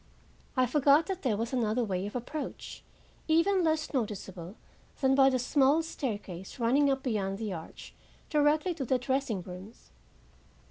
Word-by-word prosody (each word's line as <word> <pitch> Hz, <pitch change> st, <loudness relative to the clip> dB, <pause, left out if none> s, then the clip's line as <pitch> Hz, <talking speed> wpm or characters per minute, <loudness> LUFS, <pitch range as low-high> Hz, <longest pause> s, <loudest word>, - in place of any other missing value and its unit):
I 255 Hz, -, +4 dB
forgot 285 Hz, +4 st, +4 dB
that 380 Hz, -2 st, -4 dB
there 230 Hz, -6 st, 0 dB
was 230 Hz, +3 st, -3 dB
another 240 Hz, -1 st, +1 dB
way 190 Hz, -2 st, -2 dB
of 210 Hz, -, -9 dB
approach 285 Hz, +5 st, -6 dB, 0.4 s
even 345 Hz, +4 st, +3 dB
less 315 Hz, -1 st, 0 dB
noticeable 195 Hz, -6 st, -4 dB, 0.4 s
that 265 Hz, -1 st, +3 dB
by 270 Hz, 0 st, +6 dB
the 260 Hz, -, +1 dB
small 275 Hz, +5 st, +3 dB
staircase 205 Hz, -, -5 dB
running 265 Hz, +4 st, +3 dB
up 270 Hz, -1 st, 0 dB
beyond 195 Hz, -6 st, -1 dB
the 210 Hz, -2 st, -4 dB
arch 160 Hz, -2 st, -9 dB, 0.3 s
directly 305 Hz, +3 st, +2 dB
to 295 Hz, -5 st, -4 dB
the 255 Hz, +2 st, +2 dB
dressing 250 Hz, -6 st, -1 dB
rooms. 185 Hz, +4 st, -11 dB
255 Hz, 150 wpm, -30 LUFS, 210-295 Hz, 0.4 s, by